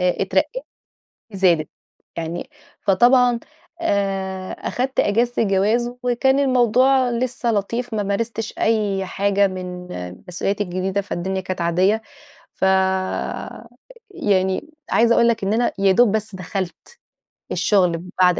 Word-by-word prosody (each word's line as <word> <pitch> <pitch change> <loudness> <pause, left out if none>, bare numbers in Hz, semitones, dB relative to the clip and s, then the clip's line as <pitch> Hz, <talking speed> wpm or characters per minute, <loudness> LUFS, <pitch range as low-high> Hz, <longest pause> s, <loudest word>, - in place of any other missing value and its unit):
أ 180 0 +1
اترقيت - - 0 0.7
زادت 175 -6 +2 0.5
يعني 170 - -5 0.3
فطبعًا 240 +4 +4 0.4
آآ 195 - -1
أخدت 260 +2 -2
أجازة 235 +3 +1
الجواز 215 +5 +1
وكان 250 +2 +2
الموضوع 255 0 +3
لسّه 240 0 -1
لطيف، 230 +4 -2
ما 210 - 0
مارستش 220 +2 -3
أي 205 -4 +1
حاجة 200 +1 +2
من 180 -1 -6 0.4
مسؤولياتي 195 +3 -1
الجديدة 185 +2 -2
فالدنيا 190 -1 -3
كانت 185 -1 -5
عاديّة، 185 +6 +2 0.5
فيعني، 190 - -1 0.2
عايزة 235 +1 +4
أقول 235 - +4
لك 225 -3 +1
إن 195 - +1
أنا 235 +2 +2
يا 195 -1 +4
دوب 215 +2 +4
بس 215 -2 -2
دخلت 185 0 -6 0.6
الشغل 195 -4 +3
من 170 +2 -5
بعد 180 -1 +4
200 Hz, 115 wpm, -21 LUFS, 190-240 Hz, 0.7 s, فطبعًا